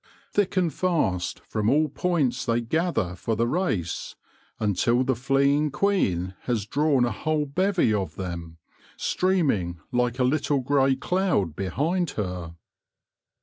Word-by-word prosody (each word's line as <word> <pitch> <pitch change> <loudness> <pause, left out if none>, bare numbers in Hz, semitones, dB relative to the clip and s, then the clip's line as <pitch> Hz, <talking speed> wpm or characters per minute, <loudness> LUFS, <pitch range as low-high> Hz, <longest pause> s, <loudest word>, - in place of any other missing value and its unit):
Thick 195 -2 0
and 175 -5 +2
fast 130 - 0
from 110 0 -1
all 155 +4 +3
points 145 -6 0
they 115 0 +1
gather 120 - -1
for 110 +4 -2
the 115 +2 +1
race, 120 - -2 0.4
until 110 +4 +2
the 130 0 +1
fleeing 140 +4 +2
queen 100 - 0
has 115 -5 -1
drawn 140 +1 +2
a 120 - -1
whole 155 -1 -1
bevy 180 - +1
of 100 -3 -2
them, 85 -3 -6 0.4
stream 185 -6 +2
ing 85 -4 -3
like 125 0 +1
a 130 - +2
little 140 +1 +1
grey 135 0 +3
cloud 180 - 0
behind 160 - -1
her. 90 -5 -4
130 Hz, 140 wpm, -25 LUFS, 100-155 Hz, 0.4 s, all